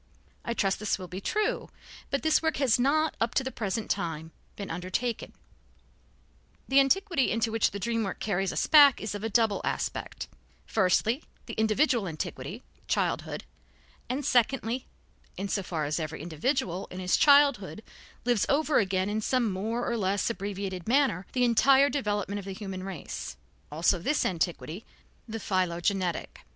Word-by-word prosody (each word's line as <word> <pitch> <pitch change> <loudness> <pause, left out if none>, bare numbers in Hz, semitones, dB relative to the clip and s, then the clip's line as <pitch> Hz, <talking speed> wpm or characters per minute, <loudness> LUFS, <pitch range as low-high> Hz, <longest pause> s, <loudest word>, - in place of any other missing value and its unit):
I 235 - -3
trust 195 -3 +1
this 210 0 0
will 185 -1 -8
be 185 +2 -7
true, 425 - -1 0.4
but 280 - -1
this 315 -1 +3
work 320 -1 0
has 260 -5 +3
not, 310 +5 +2
up 235 +2 0
to 265 - +3
the 265 - -4
present 215 -1 -3
time, 160 -4 -3 0.2
been 200 - -6
undertaken. 185 +7 -3 1.4
The 270 +1 +5
antiquity 335 +1 +2
into 225 0 0
which 225 -1 +2
the 200 - -6
dream 230 +3 -1
work 195 - -4
carries 195 -2 -1
us - - 0
back 290 -3 +7
is 215 - -4
of 205 0 -6
a 225 - -1
double 225 -1 +2
aspect, - - -3 0.4
firstly, 220 - +2 0.2
the 230 - -7
individual 220 +1 +2
antiquity, 160 -2 -5 0.2
childhood; - - -1 0.7
and, 265 +2 -2
secondly 250 -1 +1 0.5
(in 195 - -3
so 200 - 0
far 165 -4 -3
as 150 +3 -1
every 155 0 -4
individual 180 - -1
in 185 - -8
his 180 0 +2
childhood 280 -8 +4 0.4
lives 240 -5 +2
over 300 +1 +3
again 190 -2 0
in 215 +1 -1
some 240 -1 +1
more 220 +6 -2
or 235 - 0
less 200 -1 0
abbreviated 195 -3 -5
manner 250 -8 +2
the 250 - +2
entire 270 +4 +5
development 205 -6 -1
of 195 - -9
the 195 - -5
human 190 -2 -6
race), 190 -5 -6 0.3
also 170 +4 +2
this 290 - 0
antiquity, 175 +2 -2 0.4
the 225 0 -4
philogenetic. 185 -2 -1
215 Hz, 160 wpm, -28 LUFS, 185-255 Hz, 1.4 s, back